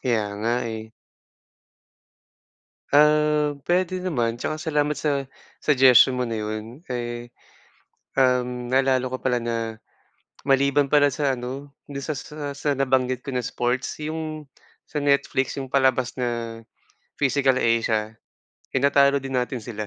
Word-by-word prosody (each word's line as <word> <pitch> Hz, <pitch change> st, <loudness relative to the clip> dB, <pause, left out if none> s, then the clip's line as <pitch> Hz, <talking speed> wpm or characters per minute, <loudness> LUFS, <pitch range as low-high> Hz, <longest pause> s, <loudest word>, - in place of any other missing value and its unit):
Kaya 115 Hz, -4 st, +1 dB
nga, 115 Hz, +3 st, 0 dB
eh. 110 Hz, 0 st, -7 dB, 2.0 s
Um, 150 Hz, 0 st, +4 dB
pwede 185 Hz, +1 st, +1 dB
naman 120 Hz, -11 st, -1 dB
tsaka 155 Hz, +5 st, -3 dB
salamat 150 Hz, -2 st, +1 dB
sa 140 Hz, -1 st, -1 dB, 0.3 s
suggestion 130 Hz, -3 st, +6 dB
mo 125 Hz, -, -1 dB
na 115 Hz, -2 st, -2 dB
yun, 110 Hz, +8 st, -6 dB
eh, 120 Hz, -1 st, -5 dB, 0.8 s
um, 125 Hz, -2 st, +1 dB
naalala 130 Hz, 0 st, +2 dB
ko 130 Hz, -, -3 dB
pala 125 Hz, -2 st, 0 dB
na 115 Hz, 0 st, -2 dB, 0.9 s
maliban 140 Hz, +1 st, +2 dB
pala 145 Hz, -1 st, +5 dB
sa 140 Hz, -4 st, 0 dB
ano, 135 Hz, +4 st, -6 dB, 0.2 s
do'n 140 Hz, -1 st, -6 dB
sa 155 Hz, +2 st, -3 dB
sa 150 Hz, 0 st, -6 dB
sa 145 Hz, 0 st, 0 dB
nabanggit 130 Hz, -2 st, +1 dB
ko -, -, -6 dB
na 130 Hz, -, -1 dB
sports, 125 Hz, +4 st, -2 dB
yung 155 Hz, -1 st, -5 dB, 0.3 s
sa 150 Hz, -, -5 dB
Netflix, 140 Hz, -2 st, +1 dB
yung 130 Hz, -, -9 dB
palabas 130 Hz, -2 st, +1 dB
na 120 Hz, -2 st, -3 dB, 0.6 s
Physical 135 Hz, -2 st, +2 dB
Asia, 110 Hz, -2 st, +1 dB, 0.6 s
tinatalo 140 Hz, 0 st, +4 dB
din 135 Hz, -1 st, -2 dB
natin 125 Hz, -1 st, -3 dB
sila. 110 Hz, -2 st, -5 dB
130 Hz, 130 wpm, -24 LUFS, 120-145 Hz, 2.0 s, suggestion